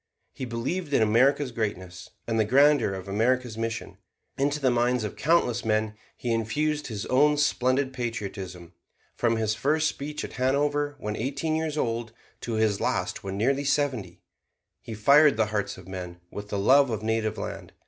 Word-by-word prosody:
He 130 - -5
believed 140 +8 -3
in - - +4
America's 125 +5 +3
greatness 95 -6 -4 0.2
and 115 -1 -1
the - - +5
grandeur 140 +2 +4
of 95 0 -6
America's 120 +3 0
mission. 115 0 -4 0.4
Into 145 +2 0
the 130 -3 +2
minds 120 0 +1
of 105 - -4
countless 140 -7 +2
men 110 -1 0 0.2
he 120 -2 -1
infused 150 +7 -1
his 105 -4 -5
own 145 +3 +3
splendid 135 -2 +1
patriotism. 95 -8 -5 0.4
From 115 -1 +1
his 110 -1 0
first 155 +7 +1
speech 150 0 -4
at - - -10
Hanover 145 +3 0
when 105 -5 -4
eighteen 140 +7 -2
years 160 -1 -2
old, 115 -4 -2 0.3
to 120 - -5
his 110 -2 +1
last - - -1
when 95 0 -4
nearly 135 +6 +1
seventy, 135 - -1 0.6
he 115 -1 -7
fired 140 +4 +5
the 110 - +3
hearts 105 -2 -2
of 90 -1 -13
men 90 -2 -7
with 105 0 -7
the 100 - -2
love 135 +7 +5
of 110 -2 -3
native 110 -1 -1
land. - - -6
120 Hz, 170 wpm, -26 LUFS, 110-140 Hz, 0.6 s, the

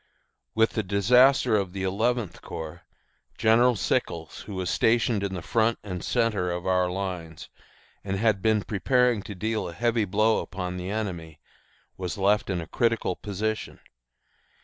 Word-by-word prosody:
With 115 0 +3
the 110 - -1
disaster 115 +6 +4
of 95 -3 -1
the 95 -1 -4
Eleventh 110 +2 -1
Corps 80 +2 -7 0.6
General 120 +3 +4
Sickles, 80 -5 -2
who 100 - -6
was 95 -2 -2
stationed 115 -2 +2
in 95 -1 -2
the 85 - -6
front 115 +3 +1
and 90 -4 -5
centre 110 -7 0
of 90 0 -4
our 90 -1 +2
lines 90 -4 -5 0.5
and 95 -1 -2
had 110 -2 +2
been 110 -1 +2
preparing 125 +2 +2
to 100 0 -8
deal 110 -1 -2
a - - -8
heavy 115 +3 +1
blow 110 +3 +2
upon 90 -1 -5
the 90 +1 -5
enemy, 90 -7 -4 0.6
was 90 +2 -4
left 100 +2 +2
in 90 -3 -1
a - - -6
critical 115 -6 0
position. 105 +3 -4
100 Hz, 155 wpm, -26 LUFS, 90-110 Hz, 0.6 s, disaster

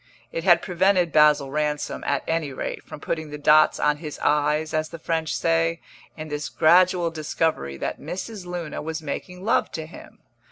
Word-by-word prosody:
It - - -4
had - - +5
prevented 180 -1 +2
Basil 150 -3 +4
Ransom, 150 0 -2
at 140 -1 0
any 160 -3 -1
rate, - - -5
from - - -11
putting 160 0 -4
the 150 - -6
dots 155 +1 +4
on 150 0 +2
his 150 -1 -7
i's, 150 +1 +1
as 155 0 -1
the - - -8
French 160 0 -2
say, 165 0 +1 0.4
in 155 0 -7
this 150 0 -4
gradual 175 +1 +4
discovery 155 - -2
that - - -4
Mrs. 190 0 -6
Luna 175 -3 -5
was 160 +1 -5
making 180 +5 -6
love 225 - +2
to 160 - -4
him. 160 - -13
155 Hz, 175 wpm, -24 LUFS, 150-170 Hz, 0.4 s, had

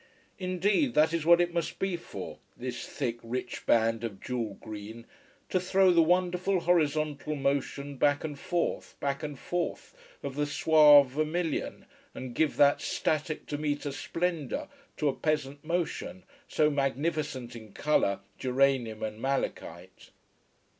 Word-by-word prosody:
Indeed 195 - +1
that 155 +2 +4
is 165 -1 -1
what 170 0 +8
it 175 0 +1
must 170 -2 -2
be 190 -2 -1
for, 170 - -8 0.2
this 125 -1 -5
thick, 120 -4 -3
rich 125 +2 -5
band 115 0 +3
of 105 -4 -5
jewel 115 -5 -3
green, 110 +2 -9 0.4
to 185 - +2
throw 185 +1 +4
the 170 -1 +5
wonderful 180 +2 +2
horizontal 155 -3 +1
motion 140 0 -2
back 145 +2 +2
and 145 -3 -5
forth, 175 +2 -2
back 140 0 -2
and 150 -3 -5
forth, 175 - -3 0.3
of 135 - -4
the 145 0 0
suave 150 -2 +7
vermilion, 155 +3 -2 0.3
and 130 -2 -6
give 155 +4 +1
that 145 0 +5
static, 155 0 -1
Demeta 145 -1 -2
splendor 170 - -2 0.3
to 150 - 0
a 140 - +2
peasant 145 -2 -2
motion, 175 +2 -3 0.2
so 150 0 +2
magnificent 140 -2 -2
in 110 -2 -11
colour, 100 -8 +1 0.2
geranium 130 -4 +1
and 110 0 -4
malachite. 135 +1 -4
145 Hz, 140 wpm, -29 LUFS, 130-170 Hz, 0.4 s, what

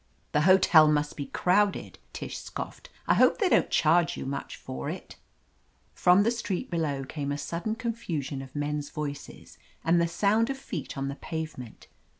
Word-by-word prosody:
"The 150 - +2
hotel 175 -4 +7
must 150 -1 +1
be 140 - -5
crowded," 200 +3 +1
Tish - - -6
scoffed. - - -7 0.2
"I - - +5
hope - - +4
they 395 -4 +2
don't - - +3
charge 165 +2 +3
you - - -5
much 140 +1 -4
for 65 +1 -6
it." - - -7 0.8
From 180 +3 +5
the 230 - +2
street 210 -6 -3
below 145 -5 -1
came 145 0 -4
a 145 - -2
sudden 170 +8 -3
con 235 -1 -2
fusion 145 - -4
of 135 0 -11
men's 145 0 -2
voices 145 -2 -7 0.2
and 170 +1 +3
the 170 - +2
sound 210 +7 +2
of 270 - -2
feet 270 - -6
on 135 0 -2
the 140 +1 -5
pavement. 155 -8 -6
160 Hz, 175 wpm, -28 LUFS, 145-200 Hz, 0.8 s, hotel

